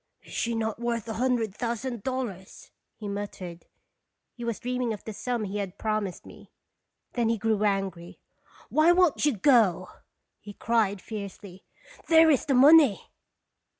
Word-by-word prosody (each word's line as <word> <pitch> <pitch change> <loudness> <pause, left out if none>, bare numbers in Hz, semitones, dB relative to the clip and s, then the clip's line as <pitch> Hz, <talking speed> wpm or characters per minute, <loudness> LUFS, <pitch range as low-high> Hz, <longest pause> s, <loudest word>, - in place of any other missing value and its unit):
" - - -42
Is - - -14
she 235 0 -1
not 220 -1 -2
worth 235 -2 -2
a 225 - -3
hun 250 +3 +1
dred 225 -5 -3
thousand 235 0 -4
dollars?" 235 -7 -6 0.2
he 210 - -8
muttered. 200 -4 -7 0.7
He 240 - -9
was 235 -2 -3
dreaming 250 -2 -2
of 210 - -9
the 220 - -7
sum 240 +1 -3
he 205 0 -4
had 195 -2 -5
promised 215 -4 -3
me. - - -14 0.6
Then 235 -2 0
he 230 - +1
grew 215 0 0
angry. 195 -4 -2 0.3
" - - -26
Why 310 +3 +5
won't 350 -4 +3
you 270 -7 0
go?" 195 - +3 0.5
he 205 0 -11
cried, 210 -3 0
fiercely. 200 -3 -9 0.4
"There 325 -1 +6
is 275 - +1
the 275 - +2
money! 280 -4 +6
225 Hz, 165 wpm, -27 LUFS, 200-250 Hz, 0.7 s, There